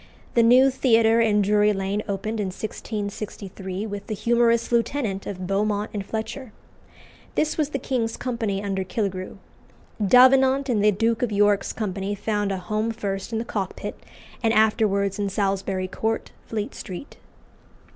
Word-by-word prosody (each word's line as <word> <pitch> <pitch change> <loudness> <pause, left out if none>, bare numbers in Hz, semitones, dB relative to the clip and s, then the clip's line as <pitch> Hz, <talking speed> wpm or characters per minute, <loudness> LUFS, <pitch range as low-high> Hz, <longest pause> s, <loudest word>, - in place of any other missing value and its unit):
The 235 - +5
new 255 +4 +6
Theatre 230 -3 +4
in 210 -2 +3
Drury 210 +1 +3
Lane 195 +1 -1
opened 215 +2 -3
in 205 - -1
1663 200 -1 -5
with 205 -2 -6
the 215 - -3
"Humorous 235 +2 +2
Lieutenant" 230 -4 0
of 185 -2 -5
Beaumont 205 +2 0
and 205 -2 -3
Fletcher. 220 +4 -5 0.8
This 310 - +1
was 305 -2 0
the 280 - -2
King's 240 -4 -2
Company 225 -6 -2
under 195 -1 -1
Killigrew. 185 0 -3 0.7
Davenant 260 +4 +5
and 215 -4 +2
the 210 - +6
Duke 225 +3 0
of 245 -3 0
York's 205 0 +2
company 200 -1 -3
found 205 0 -1
a 195 - -1
home 215 +5 -2
first 200 -2 -4
in 225 - -1
the 225 - -2
Cockpit, 200 -5 -4 0.5
and 225 -1 +2
afterwards 210 -2 +2
in 200 -1 0
Salisbury 195 -1 -1
Court, 220 +4 -2 0.2
Fleet 215 -1 -3
Street. 190 +8 -8
210 Hz, 150 wpm, -24 LUFS, 195-230 Hz, 0.8 s, new